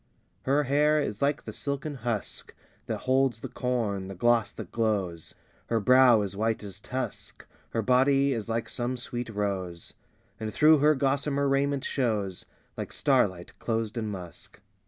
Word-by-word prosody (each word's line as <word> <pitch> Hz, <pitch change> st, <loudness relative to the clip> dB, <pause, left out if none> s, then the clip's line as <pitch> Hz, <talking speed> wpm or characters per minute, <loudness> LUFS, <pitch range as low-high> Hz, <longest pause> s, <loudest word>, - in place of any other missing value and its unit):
III -, -, -41 dB
Her 140 Hz, +3 st, +3 dB
hair 150 Hz, +3 st, +3 dB
is 105 Hz, -8 st, -3 dB
like 145 Hz, +1 st, +1 dB
the -, -, -6 dB
silken 140 Hz, +1 st, -3 dB
husk 115 Hz, -3 st, -4 dB, 0.3 s
That -, -, -3 dB
holds 130 Hz, -2 st, +1 dB
the -, -, -4 dB
corn, 110 Hz, -7 st, -2 dB
the 95 Hz, -, -7 dB
gloss 120 Hz, +3 st, +2 dB
that 105 Hz, -6 st, -8 dB
glows; 100 Hz, -8 st, -1 dB, 0.3 s
Her 115 Hz, -, +1 dB
brow 125 Hz, 0 st, +6 dB
is 100 Hz, -1 st, -4 dB
white 110 Hz, +1 st, -1 dB
as 100 Hz, -1 st, -8 dB
tusk; 125 Hz, 0 st, -6 dB, 0.2 s
Her 115 Hz, -, -1 dB
body 135 Hz, +3 st, +3 dB
is 115 Hz, -2 st, -4 dB
like 115 Hz, 0 st, -1 dB
some 125 Hz, +1 st, -2 dB
sweet 120 Hz, -1 st, -4 dB
rose, 95 Hz, -5 st, -3 dB, 0.5 s
And 110 Hz, -1 st, -3 dB
through 155 Hz, +4 st, +5 dB
her 150 Hz, +2 st, +5 dB
gossamer 140 Hz, +1 st, +1 dB
raiment 140 Hz, 0 st, +1 dB
shows 105 Hz, -8 st, -1 dB, 0.3 s
Like -, -, -5 dB
starlight 105 Hz, -11 st, +1 dB
closed 115 Hz, -1 st, -2 dB
in 115 Hz, -2 st, -2 dB
musk. 90 Hz, -5 st, -8 dB
120 Hz, 160 wpm, -28 LUFS, 105-135 Hz, 0.5 s, brow